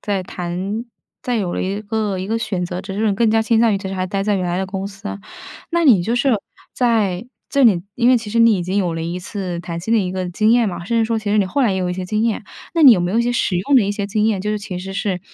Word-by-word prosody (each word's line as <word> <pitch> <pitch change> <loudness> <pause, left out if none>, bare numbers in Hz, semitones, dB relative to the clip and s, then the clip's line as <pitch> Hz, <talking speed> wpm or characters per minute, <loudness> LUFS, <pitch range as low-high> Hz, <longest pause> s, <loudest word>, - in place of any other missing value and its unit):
在 200 -3 -2
谈 185 +5 -4 0.4
在 245 -1 -1
有 185 -5 -1
了 - - -2
一 195 +2 -2
个 210 -2 -2
一 185 - -4
个 225 +2 -1
选 200 -5 -2
择， 180 +1 -4
只 195 0 -7
是 215 +3 0
你 205 - +2
更 225 +2 +2
加 225 0 +3
倾 225 0 +2
向 225 -3 +4
于 - - +1
其 195 0 -6
实 190 - -4
还 185 -1 -2
待 195 +1 -2
在 205 0 +1
原 185 -2 -1
来 175 - -1
的 190 - -1
公 190 +1 -4
司。 200 +1 -7 0.5
那 340 0 +1
你 220 - +6
就 230 +6 -1
是 265 +3 +2 0.4
在 220 -5 +1 0.2
这 280 -2 +3
里 195 -8 +4
因 240 0 +3
为 255 - +6
其 225 -3 -5
实 230 - 0
你 230 -1 +6
已 180 - -2
经 185 +3 -1
有 180 -4 0
了 165 - -3
一 170 +2 -3
次 180 -2 -5
谈 170 -1 -5
薪 190 +7 -3
的 230 - +4
一 180 -2 -2
个 185 -1 -3
经 215 +5 +2
验 240 -1 +4
嘛， 180 -3 -4
甚 235 - 0
至 225 - +3
说 225 0 0
其 215 -1 -3
实 210 - +2
你 205 - +3
后 275 +10 -1
来 235 -6 +3
也 - - -1
有 180 -1 -1
一 - - -1
些 180 0 -5
经 215 +3 0
验， 230 - -1 0.3
那 330 - +3
你 270 -4 +10
有 195 - +2
没 175 +2 -1
有 230 - +2
一 235 - +3
些 240 - 0
实 225 -6 0
用 275 +10 +2
的 245 - +6
一 200 - -1
些 205 -1 -3
经 210 +1 0
验， 215 -4 +1
就 210 +2 -2
是 210 - -1
其 200 -3 -6
实 190 +1 -7
是 195 -3 -2
205 Hz, 345 characters per minute, -19 LUFS, 185-225 Hz, 0.5 s, 你